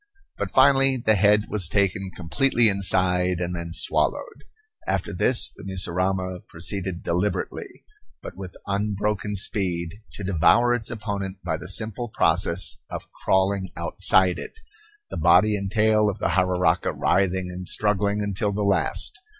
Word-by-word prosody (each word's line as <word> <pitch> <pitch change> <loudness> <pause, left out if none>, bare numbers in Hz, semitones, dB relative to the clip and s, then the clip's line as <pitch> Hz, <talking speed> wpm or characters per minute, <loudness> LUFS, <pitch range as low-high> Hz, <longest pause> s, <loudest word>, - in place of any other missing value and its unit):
But 100 - -3
finally 135 +2 +4
the 110 -3 +1
head 105 +1 +3
was 100 -5 +2
taken 95 0 -1
completely 110 +8 +2
inside 90 -2 +1
and 90 0 -3
then 85 -1 -6
swallowed. - - 0 0.4
After - - -2
this, 125 -2 +5
the - - -13
mussurama 95 0 -2
proceeded 90 +2 -4
deliberately, 90 +5 -3 0.4
but - - -9
with 95 -2 -10
unbroken 105 0 -2
speed, 90 -4 -1 0.2
to 105 - -8
devour 100 +7 +3
its 120 -3 -3
opponent 100 -4 -5
by 85 -2 -2
the 85 +2 -10
simple 110 +4 -2
process 85 - +2
of - - -8
crawling 95 0 0
outside 95 -1 +2
it, 450 - -9 0.5
the - - -5
body 105 0 +4
and 100 -1 -4
tail 110 0 +2
of 100 - -5
the 105 - -2
jararaca 90 -1 +1
writhing 95 -1 0
and 90 0 -8
struggling 105 0 0
until 100 +1 -2
the 105 +1 -3
last. 100 -1 -1
95 Hz, 140 wpm, -23 LUFS, 90-105 Hz, 0.5 s, this